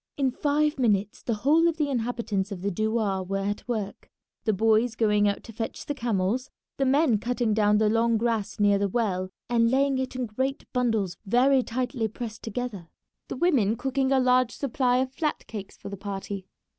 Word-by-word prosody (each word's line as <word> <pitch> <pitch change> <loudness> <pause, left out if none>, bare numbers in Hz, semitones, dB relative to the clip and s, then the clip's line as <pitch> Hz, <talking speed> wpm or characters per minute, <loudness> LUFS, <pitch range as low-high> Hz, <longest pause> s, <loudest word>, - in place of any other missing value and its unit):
In 270 -2 +1
five 295 +2 +1
minutes 210 -4 +1
the 230 - -1
whole 325 +4 +5
of 335 -1 0
the 300 -2 +1
inhabitants 225 -5 -2
of 185 -2 -6
the 200 - 0
douar 215 -1 0
were 195 +1 -3
at 205 +3 -3
work, 215 -5 -4 0.4
the 220 - +3
boys 220 +3 +2
going 210 -2 +3
out 200 - -1
to 225 - -11
fetch 225 +1 -5
the 290 - -2
camels, 235 -1 -1 0.3
the 270 - +1
men 270 -5 +3
cutting 240 -1 0
down 210 -1 +3
the 215 0 +3
long 230 +1 +2
grass 220 -3 -1
near 205 -1 +4
the 200 0 0
well 185 -4 -1 0.2
and 230 -1 +3
laying 270 +1 +2
it 260 0 -3
in 255 -1 -1
great 260 +5 -3
bundles 225 -8 0
very 260 +5 +4
tightly 245 -1 -2
pressed 220 0 -7
together, 220 -6 -5 0.4
the - - -5
women 255 - +2
cooking 265 +2 -1
a 270 - +4
large 255 -1 +3
supply 250 -2 +1
of 260 0 -1
flat 300 +1 -2
cakes 205 -3 -8
for - - -8
the 200 - -6
party. 195 -1 -5
230 Hz, 195 wpm, -26 LUFS, 205-255 Hz, 0.4 s, whole